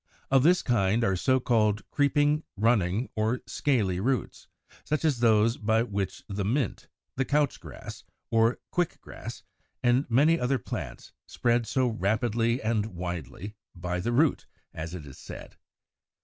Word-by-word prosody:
Of 135 -1 +6
this 175 +6 +4
kind 115 -1 +2
are 95 - +2
the 95 - 0
so 130 +7 +2
called 110 -5 +2
creeping, 145 +1 +2 0.2
running, 110 0 +2
or 110 +3 0
scaly 105 -11 0
roots, 130 +5 -2 0.4
such 155 +1 -1
as 145 -6 +2
those 115 0 +4
by 110 +1 +2
which 100 -4 -3
the 100 0 -3
Mint 120 +3 0
(Fig. - - -23
97), - - -46 0.3
the 135 - +1
Couch 145 -1 +1
grass, - - -10 0.3
or 115 +1 +3
Quick 175 -2 -1
grass, - - -9 0.4
and 125 +3 +2
many 150 +8 +4
other 130 +2 +1
plants, 110 - -7
spread 120 -1 +1
so 130 -1 +1
rapidly 115 +3 0
and 110 -1 +1
widely, 90 +3 -5 0.2
"by 90 0 -3
the 105 +7 -1
root," 140 +5 +2 0.3
as 80 +2 -5
it 80 -5 -8
is 70 - -12
said. - - -10
115 Hz, 160 wpm, -28 LUFS, 100-130 Hz, 0.4 s, Of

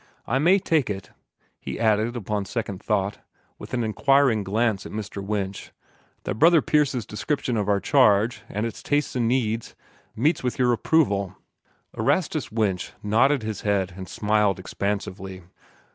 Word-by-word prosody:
I 130 - 0
may 175 +7 +5
take 160 - +1
it," 95 -5 -5 0.5
he - - -6
added 110 +1 +2
upon 105 -3 -2
second 100 -2 -4
thought, 100 -1 -1 0.4
with - - -10
an 120 - 0
inquiring 130 0 +3
glance 105 +1 0
at - - -9
Mr. 105 -2 -5
Winch, 100 -1 -4 0.5
"that 110 - -4
Brother 165 +1 +6
Pierce's 140 -7 +1
description 125 +3 -2
of 105 -2 -1
our 100 -1 +3
charge, 115 -3 +3
and 105 +2 -2
its 115 - -6
tastes 145 -1 0
and 120 -2 +1
needs, 115 -2 -1 0.4
meets 150 +9 +1
with 125 -1 -2
your 125 -1 +3
approval?" 100 - +1 0.6
Erastus - - 0
Winch 105 -5 -1
nodded 120 +5 +3
his 110 -2 -4
head 95 -3 0
and 95 -2 -8
smiled 105 -2 +1
expansively. 95 -1 -4
110 Hz, 150 wpm, -24 LUFS, 100-125 Hz, 0.6 s, Brother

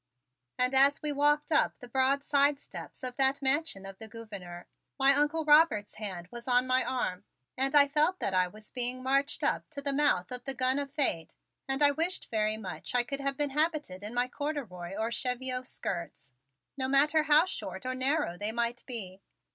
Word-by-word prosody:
And 250 +1 +2
as 275 +2 +4
we 300 - +2
walked 295 +2 +1
up 305 - +2
the 245 - -11
broad 265 +3 +1
side 285 -1 +2
steps - - -11
of 250 -1 -4
that 270 +1 +5
Mansion 270 -7 +2
of 195 -1 -10
the 220 - -8
Gouverneur, 200 -6 -10 0.3
my 275 0 +6
Uncle 295 +3 +2
Robert's 295 -9 +3
hand 185 -5 -5
was 240 0 -10
on 250 0 +3
my 255 0 +2
arm 200 -7 -3 0.3
and 270 +2 +1
I 285 -1 +7
felt 305 +6 +1
that 195 - -3
I 185 -1 +2
was 215 +3 -13
being 250 0 0
marched 275 +2 0
up - - -1
to 315 - -7
the 280 0 -2
mouth 275 -11 +1
of 250 0 -5
the 270 -1 -3
gun 260 +2 +1
of 280 -1 -5
Fate 265 - 0 0.3
and 270 +2 +1
I 285 - +7
wished 330 +6 -1
very 215 -1 +1
much 205 +3 -6
I 245 - +4
could 275 +3 -4
have 275 -1 -3
been 290 -1 0
habited 300 - -1
in 215 +3 -5
my 245 +1 +1
corduroy 235 - -6
or 220 +2 -3
cheviot 255 +1 -1
skirts, 170 - -6 0.4
no 260 -2 -2
matter 295 +4 +3
how 300 +2 +4
short 370 - -6
or 255 - -2
narrow 260 - 0
they 210 +1 -1
might 235 +1 -2
be. 195 -7 -5
260 Hz, 200 wpm, -29 LUFS, 220-285 Hz, 0.4 s, I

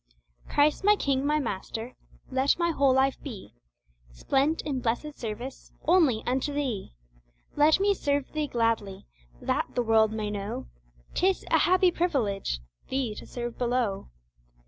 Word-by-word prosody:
Christ 295 +5 +3
my 415 +1 +6
King, 275 -6 0
my 300 +1 +3
Master, 230 -1 -4 0.4
let 265 +2 +2
my 340 -1 +1
whole 280 -4 +3
life 265 +1 +2
be, 225 - -8 0.6
Spent 275 - 0
in 280 -4 -2
blessed 245 +6 -1
service 240 +2 -7
only 310 -10 +3
until 265 +3 -1
Thee 245 - -3 0.6
Let 300 +4 +5
me 400 +1 +3
serve 285 -6 -1
Thee 305 -1 -1
gladly, 230 -6 -1 0.3
That - - -2
the 245 - +2
world 220 -1 +4
may 215 -1 -3
know 205 +1 -4 0.5
'Tis 375 +1 +1
a - - +5
happy 370 0 +4
privilege, 225 - -1 0.3
Thee 260 -4 -1
to - - -10
serve 240 -1 -5
below. 240 - -1
265 Hz, 145 wpm, -27 LUFS, 225-300 Hz, 0.6 s, my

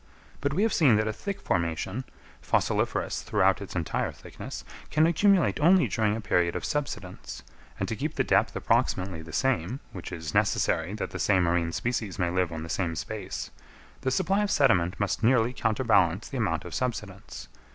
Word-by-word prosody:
But 140 0 -1
we 195 - +2
have 225 - +2
seen 135 -9 +5
that 110 +1 +1
a 110 - -1
thick 200 - -5
formation, 85 +8 -2 0.4
fossiliferous - - 0
throughout 95 +1 +2
its 100 - -8
entire 85 -3 -1
thickness, - - -9 0.2
can 155 +1 +3
accumulate 170 - +3
only 170 -2 +5
during 110 0 +1
a 115 - -4
period 90 -4 +1
of - - -3
subsidence; 140 - -4 0.4
and - - -1
to - - -2
keep - - -3
the - - +2
depth - - +2
approximately 90 -3 0
the 80 0 -10
same, 120 - 0
which 90 -1 -8
is 80 -4 -5
necessary 85 +5 +1
that 110 - -4
the - - -6
same 95 -3 +3
marine 85 -1 +1
species 115 -3 -2
may 90 -3 0
live 90 -1 0
on 80 -1 -5
the - - -6
same 85 -1 -1
space, 75 - -5 0.5
the 130 - 0
supply 190 +8 +1
of 205 - 0
sediment 95 - +3
must 100 +2 -1
nearly 120 0 +3
counterbalance 110 -6 +2
the 135 - -5
amount 85 -9 -1
of 90 - -7
subsidence. 105 -6 -4
105 Hz, 185 wpm, -27 LUFS, 85-130 Hz, 0.5 s, seen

